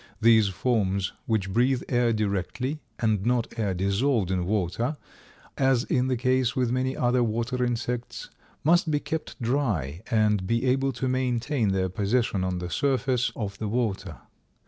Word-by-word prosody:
These 110 -2 +5
forms 100 -2 0
which 100 -4 0
breathe 125 +3 +2
air 120 -2 +2
directly, 110 - -2 0.2
and 110 -4 +1
not 120 0 0
air 100 -4 0
dissolved 100 +2 +1
in 90 -2 -1
water, 110 - -1 0.6
as 130 -3 +3
is 125 0 +1
the 130 -1 0
case 130 0 +1
with 125 -2 +1
many 130 +1 -1
other 125 0 +2
water 120 +3 -1
insects, 120 0 -3 0.3
must 170 +2 +4
be 145 -1 +1
kept 160 0 -5
dry 110 - -1
and 105 -4 +2
be 115 +4 +1
able 135 +1 +2
to 125 +2 -2
maintain 130 -1 0
their 95 -1 +1
position 100 +1 0
on 90 -1 -1
the 90 0 -5
surface 130 -3 +1
of 100 -3 -5
the 110 - -2
water. 100 -7 -2
115 Hz, 155 wpm, -26 LUFS, 100-130 Hz, 0.6 s, These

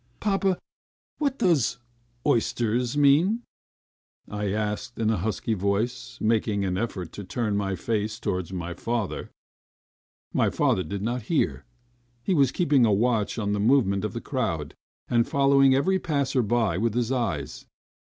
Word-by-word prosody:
"Papa, 195 -2 +1 0.6
what 280 -3 0
does 140 - +2 0.5
'oysters' 120 +2 +1
mean?" 160 +11 +4 0.8
I 105 -1 -3
asked 105 +4 -3
in 110 -1 +1
a 110 - +1
husky 110 +4 -1
voice, 105 +5 -2
making 110 -2 +1
an 90 -1 -1
effort 95 -5 -3
to 100 - -7
turn 105 +1 -2
my 100 -1 -1
face 110 +3 -2
towards 90 -4 -2
my 90 -2 -4
father. 115 +3 -3 1.0
My - - +3
father 95 - +1
did 95 +4 -4
not 120 +3 -1
hear. 165 - 0 0.6
He 190 - +1
was 140 -6 +4
keeping 145 -8 +3
a 110 - +4
watch 110 +1 +1
on 105 -2 -1
the 105 - -1
movements 105 -4 +3
of 105 - -3
the 115 - -4
crowd, 85 - -2 0.3
and 120 -1 +2
following 140 -1 +4
every 190 +8 +2
passer 140 -6 0
by 110 -5 +1
with 115 0 0
his 120 0 0
eyes. 105 - -2
115 Hz, 150 wpm, -26 LUFS, 100-135 Hz, 1.0 s, mean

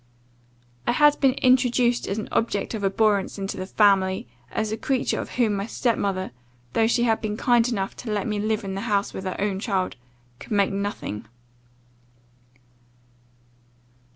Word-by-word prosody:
I - - +3
had 295 +2 +5
been 270 -2 +4
introduced 250 -2 +3
as 195 - -2
an 215 - -4
object 225 -2 0
of 215 -2 -4
abhorrence 200 0 +1
into 195 0 -4
the 185 - -5
family; 195 - +3 0.2
as 220 -1 -1
a - - 0
creature 260 +2 0
of - - -8
whom 230 -4 +2
my 200 +1 -2
step 235 -1 0
mother, 190 -2 -2 0.4
though 225 - +3
she 235 +1 +2
had 225 -2 +2
been 215 -1 -3
kind 240 -1 +3
enough 195 -5 -2
to 225 - -5
let 205 -2 -1
me 210 -1 -1
live 215 +1 0
in 195 -1 -4
the 195 - -3
house 200 -1 +1
with 190 - -6
her 185 - -3
own 195 -1 -1
child, 195 - -1 0.4
could - - -6
make 200 -1 +3
nothing. 195 - -4
210 Hz, 170 wpm, -24 LUFS, 195-235 Hz, 0.4 s, had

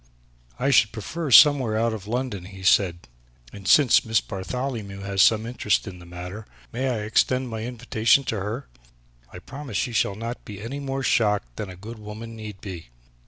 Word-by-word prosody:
"I 135 +3 +1
should 110 -5 +5
prefer 145 - -5
somewhere 130 -4 +7
out 115 0 +1
of 105 -2 -7
London," 120 -5 -3
he 95 0 -11
said, 90 -2 +2 0.5
"and 100 -1 -9
since 140 -6 +6
Miss 110 -1 +2
Bartholomew 100 0 -5
has 100 0 0
some 110 +3 +4
interest 115 -4 0
in 90 -2 -8
the 85 - -13
matter, 90 +5 -8 0.3
may 130 +3 -1
I 120 -3 -1
extend 125 +4 +1
my 110 -1 -5
invitation 120 +1 +2
to 110 -5 -2
her? 110 +8 -4 0.6
I - - -9
promise 135 +4 -7
she 120 - -1
shall 100 -2 +1
not 115 +3 -6
be 100 -2 -9
any 120 +7 -5
more 135 -1 -3
shocked 105 - +1
than 105 - -5
a 90 - -9
good 110 +5 -10
woman 110 +2 -8
need 105 -3 -9
be." 90 -7 -8
110 Hz, 185 wpm, -24 LUFS, 100-125 Hz, 0.6 s, somewhere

